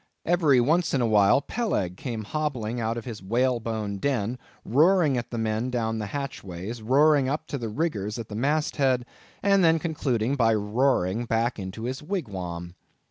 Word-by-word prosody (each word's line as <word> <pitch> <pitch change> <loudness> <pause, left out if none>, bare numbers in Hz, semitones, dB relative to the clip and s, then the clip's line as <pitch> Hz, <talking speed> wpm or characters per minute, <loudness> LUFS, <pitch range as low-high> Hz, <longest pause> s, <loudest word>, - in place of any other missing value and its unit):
Every 160 -6 +4
once 155 +6 +2
in 130 - +1
a - - +2
while 105 +4 +4
Peleg 140 - -2
came 115 +1 -5
hobbling 125 -3 -2
out 115 0 -1
of 115 - -6
his 115 -4 -7
whalebone 115 -1 -1
den, 125 -1 -1 0.3
roaring 155 - +4
at 120 -1 -3
the 120 - -5
men 110 +2 -1
down 115 -2 -1
the 105 - -3
hatchways, 110 -5 -6
roaring 140 +3 +4
up 150 +3 -2
to 140 - -3
the 115 -2 -4
riggers 105 - -2
at 115 -2 -6
the - - -9
mast 150 +8 0
head, 130 -3 +2 0.4
and 195 -1 +4
then 165 -1 +5
concluded 140 -6 -1
by 115 -2 +4
roaring 110 -1 +1
back 115 0 0
into 95 +3 -6
his 130 +2 -3
wigwam. 95 - -5
120 Hz, 175 wpm, -26 LUFS, 110-140 Hz, 0.4 s, then